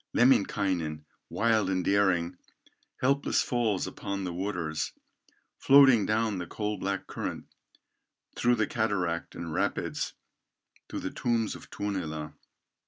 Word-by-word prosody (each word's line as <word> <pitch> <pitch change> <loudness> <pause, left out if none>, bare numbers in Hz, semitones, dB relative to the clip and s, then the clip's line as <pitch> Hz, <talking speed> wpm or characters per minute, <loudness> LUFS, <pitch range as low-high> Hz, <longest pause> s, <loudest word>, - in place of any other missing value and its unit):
Lemminkainen, 95 - +2 0.2
wild 110 -2 +2
and 95 -2 0
daring, 95 -3 +2 0.7
Helpless 140 +2 +2
falls 115 -6 0
upon 100 0 -4
the 90 -2 -3
waters, 85 -4 -2 0.7
Floating 135 -7 +7
down 110 -2 +1
the 90 - -5
coal 105 +2 -3
black 100 0 -2
current, - - -5 0.9
Through 120 0 +3
the - - +1
cataract 100 - -1
and 85 -2 -5
rapids - - -1 0.8
To - - -4
the - - -4
tombs 115 -2 0
of - - -11
Tuonela. 80 -7 -4
100 Hz, 115 wpm, -29 LUFS, 90-115 Hz, 0.9 s, Floating